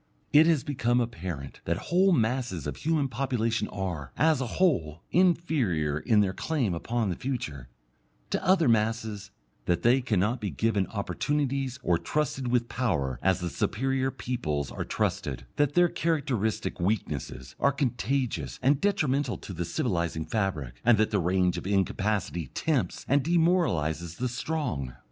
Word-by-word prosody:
It 155 +2 +7
has 160 -5 +3
become 125 -3 +1
apparent 85 - -4
that 85 +1 0 0.2
whole 190 +2 +5
masses 120 - 0
of 75 - -4
human 155 -3 +1
population 120 -3 -1
are, 90 -9 -4
as 155 -3 +3
a 130 - -1
whole, 85 - +1
inferior 140 - +2
in 110 +3 +3
their 95 -2 +1
claim 130 - -1
upon 115 +5 -1
the 90 - -1
future, 75 - -4 0.6
to - - -1
other 185 -4 +4
masses, 110 -2 0 0.4
that 85 -1 0
they 125 +3 +5
cannot 115 0 0
be 105 - -2
given 100 +4 0
opportunities 135 - -1
or 85 -1 +2
trusted 135 -4 -1
with 120 -1 +1
power 70 - -1
as 95 -1 +2
the 90 - -2
superior 135 0 0
peoples 75 - -3
are - - -4
trusted, - - -2
that 145 -1 +2
their 175 0 +6
characteristic 125 - -1
weaknesses 85 - -2
are 140 - +4
contagious 125 - -1
and 135 +2 +3
detrimental 145 -10 +1
in 95 - -5
the 85 +1 -2
civilizing 85 -2 -1
fabric, 80 - -2
and 120 -1 +5
that 110 +1 +2
their 105 - +2
range 90 +1 +1
of - - -7
incapacity 95 -3 0
tempts - - -1
and 140 +1 +3
demoralizes 130 - +1
the 125 - -1
strong. 125 - -3
115 Hz, 150 wpm, -28 LUFS, 90-135 Hz, 0.6 s, It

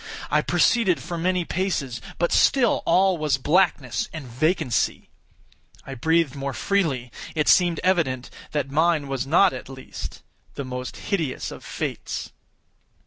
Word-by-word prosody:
I - - +4
proceeded 225 -8 +3
for 175 - -6
many 180 +1 0
paces; 145 -11 -2 0.2
but 175 - +1
still 250 -4 +4
all 190 -2 +4
was 150 -3 +1
blackness 150 -3 +1
and 155 -4 -7
vacancy. 140 +2 0 0.8
I 135 - -6
breathed 160 +2 +1
more 140 0 -3
freely. 145 -12 0 0.2
It 150 -1 +1
seemed 175 -3 +4
evident 155 -9 +1 0.2
that 140 -2 -2
mine 155 -1 +2
was 135 -1 -3
not, 175 +4 +5
at 130 - -8
least, 130 -1 -8 0.3
the 140 - -4
most 125 0 -6
hideous 165 -10 -2
of - - -10
fates. - - -4
155 Hz, 140 wpm, -24 LUFS, 135-180 Hz, 0.8 s, not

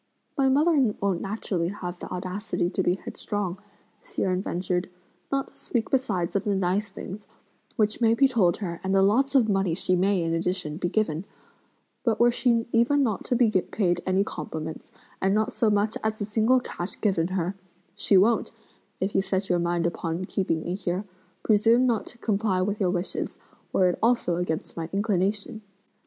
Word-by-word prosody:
"My 270 -2 +3
mother 280 -5 +3
won't 195 -3 0
naturally 195 -4 -2
have 180 -2 -5
the - - -7
audacity 185 0 -2
to - - 0
be 180 -1 +2
headstrong!" 195 -1 -4 0.4
Hsi - - -4
Jen 185 -1 +1
ventured, 180 -1 -2 0.4
"not 275 -1 0
to - - -27
speak 235 -3 -2
besides 205 -11 0
of 200 - +1
the 205 -1 0
nice 190 +3 0
things, 200 +2 -8 0.5
which 215 +2 +1
may 225 0 +4
be 275 +3 +5
told 205 -10 +2
her 170 -5 -5
and 190 +1 0
the 195 - +5
lots 265 +8 +2
of 245 -5 +5
money 195 -5 +1
she 185 0 +2
may, 190 0 +2
in 165 0 -1
addition, 165 -2 -1
be 175 -1 -1
given; 185 -4 0 0.8
but 225 -4 +1
were 240 0 +6
she 235 -1 +2
even 255 +5 +3
not 220 -7 -1
to 250 - +1
be 235 -3 +4
paid 180 -2 0
any 190 +1 +3
compliments, 160 -6 -6 0.3
and 195 +1 +2
not 215 0 +1
so 225 - +2
much 210 +1 +1
as 220 0 -1
a 205 - -1
single 220 +4 +3
cash 180 -6 -5
given 185 -6 +1
her, 185 0 -1 0.4
she 200 0 +3
won't, 220 +5 +3 0.5
if 195 +2 -1
you 195 - +3
set 190 0 -2
your 175 - +2
mind 170 0 0
upon 170 +1 -2
keeping 165 -5 -1
me 175 - -3
here, 185 +1 -2 0.4
presume 225 +3 +4
not 235 -4 0
to 240 - -9
comply 205 -4 0
with 200 +3 -1
your 190 -3 +2
wishes, 180 +1 -2 0.3
were 185 - +4
it 175 - -2
also 230 -7 +2
against 175 0 -3
my 165 0 -4
inclination. 205 +2 0
195 Hz, 185 wpm, -26 LUFS, 180-220 Hz, 0.8 s, were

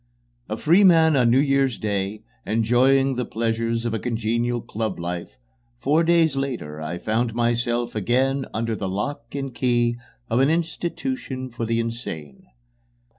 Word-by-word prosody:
A 110 - -2
free 175 - +4
man 165 -4 +6
on 125 -3 +4
New 120 - +4
Year's 135 -3 +2
Day, 100 0 -2 0.2
enjoying 125 +5 +3
the 125 - 0
pleasures 115 0 -1
of 115 - -1
a 110 - -1
congenial 120 +1 -1
club 110 -3 -4
life, 85 0 -5 0.4
four 155 - +2
days 165 -3 +3
later 120 - -4
I 80 +3 -4
found 115 +4 -1
myself 120 0 0
again 130 +6 +1
under 115 0 -2
the 95 -3 -3
lock 115 +6 -4
and 135 -2 -4
key 120 -1 +1 0.3
of 115 +2 +1
an 135 +2 +4
institution 165 - -3
for 115 0 -4
the 115 0 +1
insane. 115 - -6
120 Hz, 150 wpm, -23 LUFS, 110-135 Hz, 0.4 s, man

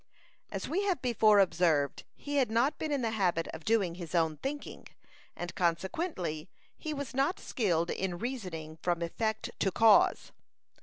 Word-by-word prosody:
As - - -4
we 370 +5 0
have 375 -7 +1
before 225 -4 +4
observed, 165 -7 +2
he 290 0 -4
had 260 -4 +3
not 235 +6 +1
been 310 - -2
in 280 -3 0
the 225 - 0
habit 180 -6 +1
of 160 - -8
doing 205 -5 +2
his 175 -1 -6
own 160 -2 +2
thinking, 285 - -6 0.5
and, 175 0 -5
consequently, 175 - -2 0.3
he 310 - -5
was 285 -4 -5
not 275 +10 +1
skilled 170 -7 0
in 185 -2 -2
reasoning 180 -10 -5
from 175 -1 0
effect 220 +5 -2
to 195 - +2
cause. 220 +1 +4
200 Hz, 160 wpm, -31 LUFS, 170-255 Hz, 0.5 s, before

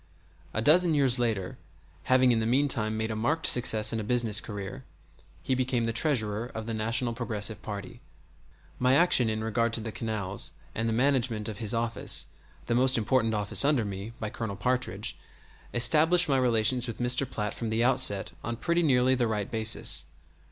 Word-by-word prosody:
A 110 - -2
dozen 165 +3 +4
years 135 -3 +2
later 110 -8 -2 0.5
having 130 -1 +4
in 115 - +1
the 110 - -1
meantime 120 -4 +1
made 110 0 -2
a - - -3
marked 150 +9 -1
success 110 -3 +3
in 115 - -2
a - - -4
business 110 -2 0
career 105 +4 -7 0.6
he 130 - -1
became 125 -2 -1
the 115 0 -2
Treasurer 115 -4 -1
of 110 -1 -5
the 115 - -4
National 115 +2 -1
Progressive 110 -3 -3
party. 105 +3 -8 0.8
My 125 +1 +3
action 140 -8 +3
in 110 0 -3
regard 115 +1 -1
to 115 - +3
the 110 0 -6
canals, 105 -3 -3 0.2
and 115 +1 -2
the - - -1
management 120 -3 0
of 110 -1 -7
his 110 0 0
office, 115 0 +1 0.4
the 120 - -1
most 130 +2 +4
important 115 0 +1
office 105 +4 +3
under 140 -6 +2
me, 100 +3 -7
by 105 -1 -4
Colonel 110 -4 -5
Partridge, 125 +6 -2 0.6
established 155 +9 +4
my 135 -2 +2
relations 125 0 +2
with 115 - -6
Mr. 125 +2 0
Platt 105 0 -4
from 115 - -5
the 110 +1 0
outset 125 -8 +2
on 115 - -4
pretty 170 +8 0
nearly 130 -4 +3
the 120 -2 0
right 105 -2 -3
basis. 110 0 +1
115 Hz, 180 wpm, -27 LUFS, 110-130 Hz, 0.8 s, dozen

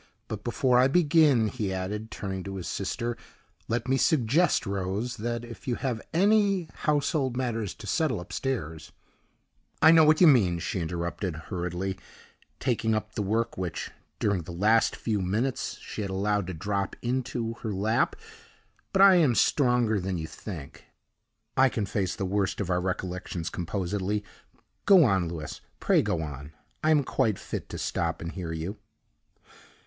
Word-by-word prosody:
But 105 -1 -6
before 125 0 +2
I 130 - +6
begin," 145 -6 +4
he 105 -4 -3
added, 100 +4 -4
turning 95 -3 -5
to 100 0 -5
his 90 -3 -5
sister, 120 +4 -2 0.5
"let 120 +3 -1
me 135 +1 +2
suggest, 150 +2 +3
Rose, 100 +4 -2
that 120 +2 -3
if 115 -5 -11
you 120 - +1
have 120 -4 -2
any 200 -1 +3
household 145 -4 0
matters 115 -6 -2
to 115 - -11
settle 130 - 0
upstairs 85 - -4 0.5
" - - -42
"I 160 - +9
know 165 -1 +7
what 155 0 +5
you 180 - +8
mean," 110 - +5
she 90 +2 -3
interrupted, 85 +1 -3
hurriedly, 90 +3 -4 0.6
taking 115 -3 +1
up 110 0 -3
the 110 - -2
work 110 +2 -1
which, 90 -3 -4 0.3
during 100 -3 0
the 85 - -9
last 105 +6 +3
few 105 -4 -1
minutes, 110 +8 -1
she - - -7
had 100 - -3
allowed 100 0 0
to 90 - -4
drop 100 +3 -2
into 120 -2 -2
her 110 - -3
lap; 105 +4 +1 0.8
"but 195 - +6
I 195 -2 +8
am 145 -9 +4
stronger 120 -6 +3
than 95 0 -2
you 80 - -4
think; 80 -4 -9 0.7
I 130 0 +5
can 110 -4 -2
face 95 -1 -1
the 95 - -3
worst 100 +1 0
of 95 -3 -2
our 90 0 +1
recollections 90 -2 -3
composedly. 100 +3 -2 0.6
Go 195 -4 +8
on, 95 - +2
Louis; 80 -2 -6 0.2
pray - - +3
go 80 -2 -1
on 70 0 -7 0.3
I 155 - +3
am 150 -2 +4
quite 115 -6 0
fit - - -6
to - - -6
stop - - -2
and 85 0 -5
hear 90 -4 -5
you." 80 +6 -4
105 Hz, 165 wpm, -27 LUFS, 95-130 Hz, 0.8 s, I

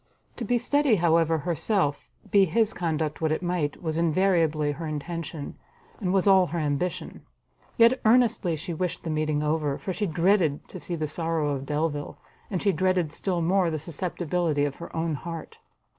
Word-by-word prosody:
To 245 - -4
be 245 +3 +2
steady, 280 0 +2
however, 165 -2 +3
herself, 165 0 -1 0.2
be 200 -1 +6
his 220 +5 +1
conduct 160 -3 -2
what 160 -1 +1
it 155 - -1
might, 175 -3 -2
was 160 -1 -1
invariably 165 -3 +2
her 160 +3 -5
intention, 155 0 -5 0.4
and 185 -4 -1
was 190 -1 +2
all 190 -2 +6
her 170 - -4
ambition: 150 +3 -2 0.6
yet 235 +3 +5
earnestly 225 -7 +3
she 170 +3 -5
wished 180 +1 -3
the 165 - -3
meeting 155 -1 0
over, 150 -2 0
for 190 - -4
she 205 +2 -1
dreaded 170 -2 +2
to - - -7
see 175 - -4
the 155 -2 -2
sorrow 160 -1 -1
of 135 -1 -4
Delvile, 150 -1 -2 0.3
and 185 -4 -2
she 200 - +4
dreaded 185 -4 +1
still 180 -1 -1
more 180 +1 +2
the 160 - -2
susceptibility 165 -1 -1
of 140 -1 -4
her 170 - -8
own 160 0 -1
heart. 165 +2 -7
165 Hz, 175 wpm, -26 LUFS, 155-185 Hz, 0.6 s, be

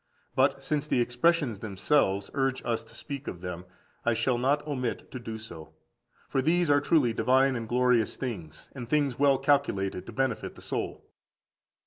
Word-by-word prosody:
But 135 +1 +2
since 150 +1 -1
the 130 - +2
expressions 120 - +2
themselves 100 -1 +1
urge 135 -1 0
us 115 -1 -1
to - - -16
speak 140 -2 -7
of 85 - -6
them. 90 -1 -6 0.4
I 120 -1 +2
shall 120 +1 +1
not 145 +4 +1
omit 130 -5 -3
to 130 - -5
do 115 -2 -6
so. 85 -8 -10 0.5
For 135 - 0
these 165 +2 +2
are 145 0 +5
truly 140 -6 +3
divine 130 +4 +3
and 115 -2 -4
glorious 125 -2 +2
things, 90 - -6
and 120 -4 -7
things 145 -4 +1
well 140 -1 +5
calculated 130 -10 +1
to - - -6
benefit 130 -1 -2
the - - -13
soul. - - -4
125 Hz, 170 wpm, -28 LUFS, 115-140 Hz, 0.5 s, are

